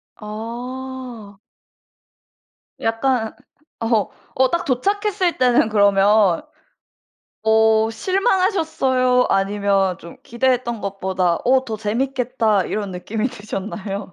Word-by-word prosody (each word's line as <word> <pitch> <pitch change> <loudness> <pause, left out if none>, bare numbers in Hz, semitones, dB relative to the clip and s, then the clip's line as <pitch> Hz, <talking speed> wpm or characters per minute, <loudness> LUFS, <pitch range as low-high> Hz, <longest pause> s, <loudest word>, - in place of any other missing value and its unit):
아. 235 0 -7 1.4
약간 225 0 0 0.5
어. 225 -4 +1 0.3
어 260 0 +3
딱 340 +1 0
도착했을 390 - 0
때는 245 -3 +3
그러면 200 -2 +4 1.0
어 220 0 +3
실망하셨어요? 320 - +1
아니면 195 -1 +1
좀 170 - -12
기대했던 240 -2 0
것보다 190 -3 -1
'어 260 +1 +3
더 220 - -4
재밌겠다.' 230 -2 0
이런 205 -2 -3
느낌이 215 +6 -3
드셨나요? 205 -3 -6
225 Hz, 205 characters per minute, -20 LUFS, 205-255 Hz, 1.4 s, 그러면